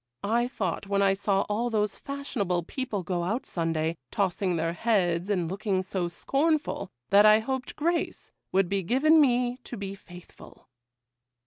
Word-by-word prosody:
I 235 +4 +1
thought, 195 -5 -3
when 200 0 +2
I 195 -1 +4
saw 195 0 +1
all 225 +4 -1
those 210 -2 0
fashionable 215 -11 -2
people 220 0 -4
go 175 -1 -2
out 220 +9 -2
Sunday, 165 -1 -1
tossing 185 -2 0
their 165 +1 -1
heads 180 -4 +1
and 180 -5 0
looking 190 +1 -1
so 185 -2 -2
scornful, 280 - 0 0.2
that 205 +2 +7
I 215 0 +8
hoped 255 +3 -3
grace 335 +3 -2 0.2
would 190 -1 +3
be 195 +1 0
given 290 - +4
me 250 -2 +2
to 250 -1 -9
be 195 -1 -5
faithful. 180 -2 -14
200 Hz, 155 wpm, -27 LUFS, 180-245 Hz, 0.2 s, I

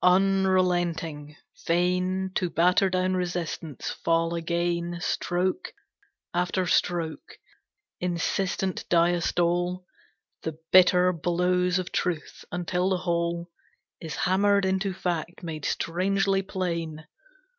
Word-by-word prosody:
Unrelenting, 180 -5 +2 0.2
fain 180 +2 0
To 180 -2 0
batter 180 +4 +3
down 185 0 +1
resistance, 175 -5 -3
fall 165 0 0
again 170 +1 -1
Stroke 180 - -1 0.6
after 180 +1 0
stroke, 170 -2 -1 0.6
insistent 180 +2 -1
diastole, 175 +1 +2 0.6
The 160 -1 -5
bitter 180 0 +6
blows 180 +2 +1
of 185 -1 -3
truth, 170 -4 -2
until 180 +1 0
the 190 - +1
whole 170 -1 -2 0.5
Is 160 -2 -6
hammered 200 +2 +2
into 190 +1 0
fact 175 -1 -3
made 155 -4 -5
strangely 195 +3 +1
plain. 170 -5 -3
180 Hz, 95 wpm, -26 LUFS, 170-185 Hz, 0.6 s, bitter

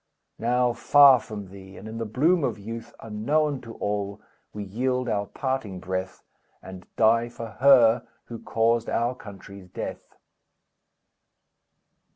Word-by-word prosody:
Now, 125 +1 +1
far 135 +2 +6
from 105 -3 -8
thee, 95 0 -13
and 105 - -10
in 110 +1 -7
the 115 - -3
bloom 155 - +2
of - - -1
youth, 115 +3 -8
Unknown 140 +7 -1
to 115 -1 -10
all, 100 0 -3 0.3
we 105 - -6
yield 125 +5 -2
our 105 -3 -1
parting 130 -8 -3
breath, 95 +1 -5 0.4
And 95 -1 -11
die 115 +1 +3
for 115 -1 -8
her, 125 -4 +5 0.2
who 115 -1 -8
caused 115 +1 0
our 120 +2 0
country's 100 -4 -12
death!" - - -7
115 Hz, 135 wpm, -25 LUFS, 100-125 Hz, 0.4 s, far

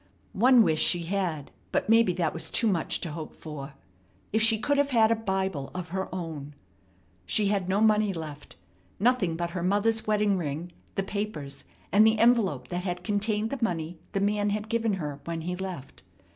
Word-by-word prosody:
One 245 +3 +6
wish 155 -5 +2
she 175 -1 +4
had, 170 -5 -2 0.2
but - - 0
maybe 225 -3 +5
that 170 -3 -1
was 165 - -4
too 235 - +1
much 185 -7 0
to 165 - -3
hope 155 0 -7
for. 145 -3 -8 0.6
If 220 - +3
she 225 0 +5
could 285 +6 +1
have 285 0 +2
had 225 -4 +4
a - - +4
Bible 190 -9 -2
of 180 -1 -5
her 190 +2 -3
own! 155 -5 -6 0.7
She 210 -2 +3
had 195 -3 0
no 195 +3 +2
money 215 -1 +4
left. 155 -4 -8 0.4
Nothing 215 -6 +2
but 170 0 -3
her 180 0 -4
mother's 205 +5 +1
wedding 210 -2 +2
ring, 160 +2 -4 0.2
the 195 - 0
papers, 190 -10 -5 0.3
and 205 +4 +6
the 220 0 +4
envelope 210 - +3
that 175 0 -3
had 180 -1 -3
contained 210 +1 -1
the 275 -4 -3
money 165 -4 -2
the 195 - +1
man 205 +1 +1
had 210 +1 -3
given 230 -2 +1
her 150 -6 -4
when 165 -1 -3
he 180 +2 -3
left. 180 -7 -7
190 Hz, 190 wpm, -27 LUFS, 165-215 Hz, 0.7 s, One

